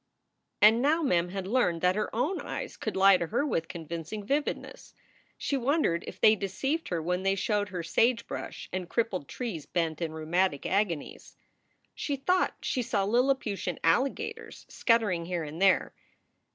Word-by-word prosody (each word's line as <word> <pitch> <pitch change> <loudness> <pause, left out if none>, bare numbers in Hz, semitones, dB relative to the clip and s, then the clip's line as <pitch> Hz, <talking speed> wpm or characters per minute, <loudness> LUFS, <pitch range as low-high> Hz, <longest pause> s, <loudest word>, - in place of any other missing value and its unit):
And 220 +3 +7
now 315 +5 +2
Mem 175 - +2
had 190 0 -4
learned 190 -6 +1
that 180 +1 +3
her 210 - -1
own 290 +11 0
eyes - - -5
could - - -4
lie 195 0 +7
to 170 - -3
her 240 - 0
with 165 - -1
convincing 170 +5 -6
vividness. 290 - -3 0.4
She 280 - -1
wondered 265 - +1
if - - -8
they 215 - +6
deceived 270 - -2
her 175 - -1
when 180 +2 -1
they 195 0 +1
showed 205 +1 0
her 180 -3 -4
sagebrush 230 +8 -1
and 185 -1 -3
crippled 200 - -1
trees 215 - -5
bent 165 -2 -1
in 165 -2 -2
rheumatic 160 0 0
agonies. 190 -6 -2 0.6
She 285 - -2
thought 360 +7 +1
she 255 - 0
saw 225 -4 0
Lilli 250 +6 +3
putian 200 -7 -4
alligators 445 - -1
scuttering 210 -8 +1
here 175 -1 -2
and 155 +3 -7
there. 195 -1 +3
195 Hz, 165 wpm, -29 LUFS, 175-250 Hz, 0.6 s, And